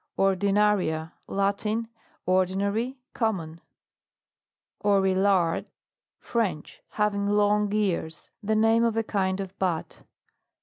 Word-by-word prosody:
ORDINARIA. 195 -4 +2
Latin. 205 +3 -1 0.4
Ordinary, 200 +7 0 0.2
com 220 -3 +1
mon. 165 -2 -8 1.2
OREILLARD. 190 -3 +2 0.5
French. 195 -10 -3
Having 205 -1 0
long 205 0 +2
ears. 190 -6 -2
The 215 +1 0
name 225 +1 +4
of 230 -1 +1
a 225 - +2
kind 190 -3 -1
of 195 -1 -6
bat. 175 -4 -2
200 Hz, 95 wpm, -26 LUFS, 185-210 Hz, 1.2 s, name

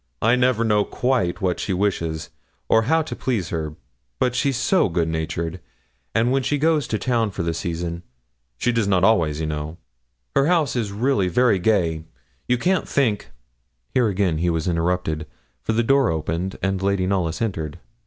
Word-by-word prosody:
'I 115 +3 +4
never 125 -2 +2
know 105 -2 +3
quite 125 -7 0
what 90 -2 0
she 95 - -1
wishes, 85 -5 -1 0.4
or 110 - +4
how 160 0 +4
to 155 - -6
please 110 -10 -2
her; 80 -2 -3 0.4
but 125 - +1
she's 135 0 +1
so 185 - +2
good 85 -1 0
natured; 80 +2 -3 0.6
and 115 +2 +3
when 135 +1 +2
she 145 +3 0
goes 155 -2 +2
to 110 - -1
town 115 -2 +1
for 95 -2 -4
the 85 0 -1
season 85 +1 -3 0.6
she 120 - +1
does 115 -4 +1
not 95 -2 +2
always, 85 -8 +3
you 80 - -1
know 75 +1 -4 0.6
her 140 - +4
house 165 -6 +2
is 110 -5 -1
really 105 -2 +1
very 105 +2 +3
gay 85 -5 +1 0.4
you 125 - +2
can't 185 +9 0
think 115 -8 +1 0.3
' - - -48
Here 125 -3 +3
again 95 -5 0
he 90 +1 +1
was 80 -1 -1
interrupted, 85 -2 -1 0.3
for 115 - -1
the 115 +1 +2
door 135 +1 +3
opened, 85 +4 -2
and 95 -1 0
Lady 100 -1 +1
Knollys 90 -4 0
entered. 80 -9 -3
95 Hz, 185 wpm, -22 LUFS, 85-120 Hz, 0.6 s, I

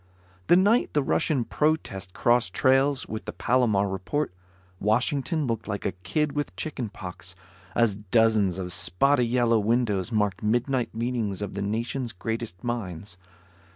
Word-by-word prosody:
The - - +7
night 205 +7 +3
the 145 - +2
Russian 135 -1 +1
protest 150 - -1
crossed 115 -3 +1
trails 135 +2 +3
with 110 0 -6
the - - -4
Palomar 115 -6 +2
report, 95 +7 -2 0.5
Washington 135 - +1
looked 115 -3 -3
like 100 -2 -4
a - - +1
kid 140 - -1
with 145 +1 -3
chicken 130 -8 -4
pox, 90 -3 -8 0.4
as 115 -4 +2
dozens 105 -2 +2
of 90 -2 -4
spotty 125 +8 +3
yellow 120 -1 +3
windows 110 -2 0
marked 105 -3 0
midnight 120 +3 0
meetings 115 -4 -2
of 100 - -5
the 100 - -4
nation's 115 +4 -2
greatest 110 -1 -5
minds. 100 -6 -5
115 Hz, 145 wpm, -26 LUFS, 100-130 Hz, 0.5 s, The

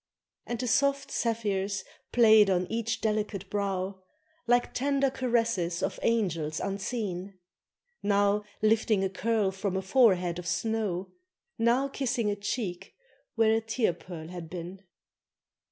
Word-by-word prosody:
And 240 - -2
the 250 - -3
soft 280 +4 +2
zephyrs 200 -4 -1 0.3
played 220 -3 +6
on 185 -1 +2
each 230 0 -1
delicate 210 -3 -1
brow, 195 -2 -2 0.5
Like 245 0 +2
tender 275 0 +1
caresses 230 -10 0
of - - -2
angels 165 -9 0
unseen; 195 -2 -3 0.6
Now 205 0 +2 0.2
lifting 215 -2 +3
a 190 - +1
curl 215 0 0
from 190 0 -2
a - - -1
forehead 185 -6 +3
of 175 - -7
snow, 195 0 -1 0.5
Now 240 +4 +3
kissing 245 -6 -1
a - - -1
cheek 200 -3 -4 0.4
where 225 -1 +4
a 225 - +2
tear 225 -3 0
pearl 165 -2 -9
had 175 -2 -7
been. 180 +2 -7
205 Hz, 130 wpm, -29 LUFS, 185-230 Hz, 0.6 s, played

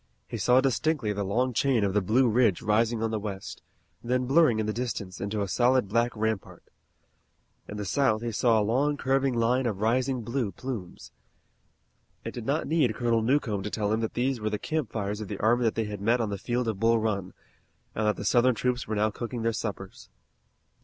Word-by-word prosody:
He - - -5
saw 125 +1 +4
distinctly 135 -3 0
the 100 0 -2
long 120 +6 0
chain 125 -2 +2
of 100 -1 0
the 105 - +2
Blue 120 +7 +3
Ridge 115 -5 +2
rising 110 +1 +1
on 115 - 0
the 110 - -1
west, 100 -2 -6 0.4
then 125 +1 0
blurring 135 -3 +4
in 110 - 0
the 110 - -1
distance 105 -6 -4
into 100 +1 -2
a - - -3
solid 125 +2 +2
black 115 +3 +1
rampart. 110 -2 -3 1.0
In 105 - -7
the 105 - -4
south 115 +1 +1
he 120 - -2
saw 115 +1 +3
a - - +2
long 140 +7 +1
curving 135 -1 +1
line 120 +2 +2
of 105 -4 -3
rising 125 +3 0
blue 115 -3 -2
plumes. 110 -6 -7 1.1
It - - -5
did 120 -2 -7
not 145 +4 0
need 150 -8 +1
Colonel 115 -2 +1
Newcomb 115 -4 +1
to 105 - -4
tell 105 0 -1
him 110 - +1
that 110 -1 -3
these 125 +1 0
were 110 0 -1
the 105 - -2
campfires 110 -8 -3
of 105 - -5
the 100 - -5
army 120 +4 +2
that 110 - +1
they 115 - 0
had 105 -1 -6
met 115 +4 +2
on 110 -3 -1
the 100 - -4
field 120 +4 -1
of 110 -3 -2
Bull 115 +1 +3
Run, 100 -5 -2 0.6
and 110 -1 -1
that 105 - +2
the - - -6
Southern 125 0 +4
troops 125 +2 -1
were 110 - -2
now 105 +1 +1
cooking 120 +1 -5
their 115 0 +1
suppers. 100 -3 -6
115 Hz, 215 wpm, -27 LUFS, 105-125 Hz, 1.1 s, saw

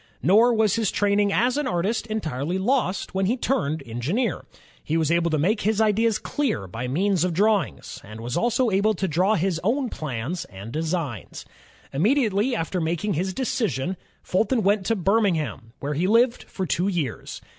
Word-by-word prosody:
Nor 220 - +5
was 215 -1 +2
his 220 -4 +1
training 205 0 +2
as 245 +6 +2
an 295 -2 0
artist 215 +2 -1
entirely 170 - -2
lost 195 -4 0
when 190 0 +1
he 240 +5 +1
turned 160 - -1
engineer. 145 - -2 0.4
He 160 - 0
was 160 -1 +1
able 170 0 +2
to 155 - +1
make 205 +9 +1
his 215 0 +1
ideas 220 0 +3
clear 265 - -2
by 115 +7 -5
means 180 +6 +1
of 180 -2 -1
drawings, 205 0 0
and 110 +2 -10
was 120 +2 -4
also 240 +4 +1
able 205 +3 +2
to 190 +2 -1
draw 185 +6 +2
his 180 -2 0
own 250 +5 +1
plans 150 - -4
and 100 +4 -10
designs. 155 - -3 0.5
Immediately 220 - +2
after 180 -1 -2
making 170 +5 -1
his 185 +4 -1
decision, 190 - -1 0.3
Fulton 220 +5 +1
went 200 0 +2
to 225 - +2
Birmingham, 170 - 0
where 145 +1 -2
he 170 +6 0
lived 235 +3 +3
for 190 - -4
two 175 +2 0
years. 165 - -3
190 Hz, 175 wpm, -24 LUFS, 160-220 Hz, 0.5 s, Nor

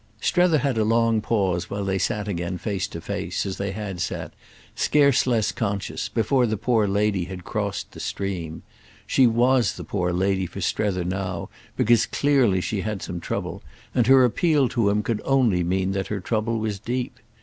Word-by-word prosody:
Strether 175 -3 +3
had 135 -4 0
a - - +3
long 115 0 +2
pause 95 -6 0
while 100 0 -3
they 95 0 0
sat 105 +3 -1
again 90 -2 -3
face 100 +1 -2
to - - -7
face, - - -3
as 95 -1 -4
they 100 0 -2
had 95 -3 -5
sat, 85 - -4 0.4
scarce 140 -3 +3
less 115 -4 +2
conscious, 100 -4 -3
before 125 +3 +2
the 110 -1 -1
poor 110 0 +2
lady 100 -2 +1
had 90 -1 -8
crossed 100 -1 -3
the - - -11
stream. 90 -5 -4 0.4
She 130 - +4
was 120 0 +3
the - - -8
poor 90 -3 -1
lady 95 +1 0
for - - -8
Strether 95 -4 0
now 90 -1 -3 0.3
because 120 +1 +4
clearly 130 -10 +2
she 100 +1 -2
had 105 -2 -4
some 85 - -5
trouble, - - -4 0.3
and 120 -3 +2
her 130 -1 +7
appeal 145 +2 +2
to 115 -4 +1
him 105 +1 +1
could 115 -1 -2
only 120 -10 +2
mean 95 +2 0
that 95 0 -2
her 105 - -3
trouble 110 +4 -1
was 110 -2 -2
deep. 125 +4 -3
105 Hz, 185 wpm, -24 LUFS, 95-120 Hz, 0.4 s, her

